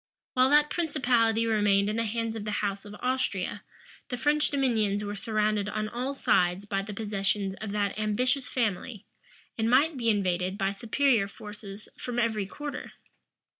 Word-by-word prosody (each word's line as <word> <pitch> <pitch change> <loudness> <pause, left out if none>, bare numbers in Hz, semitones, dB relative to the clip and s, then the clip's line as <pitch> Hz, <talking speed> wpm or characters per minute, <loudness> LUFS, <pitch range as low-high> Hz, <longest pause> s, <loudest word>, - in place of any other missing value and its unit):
While 255 +1 +4
that 295 +1 +5
principality 245 -9 +2
remained 205 -3 +3
in 210 - -1
the 230 0 0
hands 230 +1 -2
of 220 - -4
the 210 - -4 0.2
house 200 0 -3
of 205 0 -9
Austria, 250 -7 -1 0.5
the 250 - -3
French 295 +4 +2
dominions 220 -7 +1
were 205 0 -3
surrounded 215 -1 0
on 215 0 -2
all 250 +5 -3
sides 180 -5 +2
by 195 -1 -1
the 205 +2 -7
possessions 195 -2 -1
of 215 -2 -4
that 205 0 -1
ambitious 250 +5 0
family, 220 -2 -2 0.5
and 220 +1 +2
might 285 +5 +4
be 230 -2 +1
invaded 185 -2 0
by 195 -1 +1
superior 230 +1 +2
forces 205 0 -10
from 245 -1 -4
every 220 -4 +1
quarter. 290 +7 -6
215 Hz, 165 wpm, -28 LUFS, 200-250 Hz, 0.5 s, that